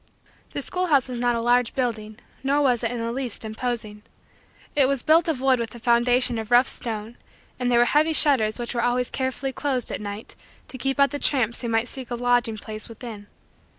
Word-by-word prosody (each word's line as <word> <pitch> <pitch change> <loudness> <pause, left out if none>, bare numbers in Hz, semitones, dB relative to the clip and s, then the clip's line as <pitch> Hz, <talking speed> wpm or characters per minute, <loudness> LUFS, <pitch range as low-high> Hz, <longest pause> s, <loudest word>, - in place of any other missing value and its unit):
The - - -3
schoolhouse 310 -8 +1
was 245 -1 -4
not 240 0 +1
a 230 - -1
large 245 0 +2
building 220 -4 -3 0.2
nor 275 +2 +1
was 250 -3 +2
it, 230 - +1
in 245 - -4
the 230 0 -3
least, 245 -3 -3
imposing. 220 -1 -4 0.7
It 280 -3 +5
was 275 -2 -1
built 325 +2 +4
of 300 -6 -1
wood 265 -2 +3
with 230 0 -4
a - - -9
foundation 240 0 +3
of 220 -1 -6
rough 245 +1 +5
stone 225 0 -4 0.4
and 250 -1 0
there 240 - +3
were 240 - +5
heavy 305 +5 +2
shutters 255 -9 +4
which 240 -1 -4
were 240 - -1
always 245 +1 0
carefully 260 0 -2
closed 260 -3 -2
at - - -4
night 205 +1 -7 0.3
to 260 - -4
keep 270 +1 -1
out 280 0 +4
the 290 - -4
tramps 240 -6 +1
who 240 - -3
might 225 +1 +1
seek 260 -2 -8
a 240 - -2
lodging 245 -2 +1
place 215 +1 -6
within. 225 -3 -9
245 Hz, 215 wpm, -24 LUFS, 230-265 Hz, 0.7 s, It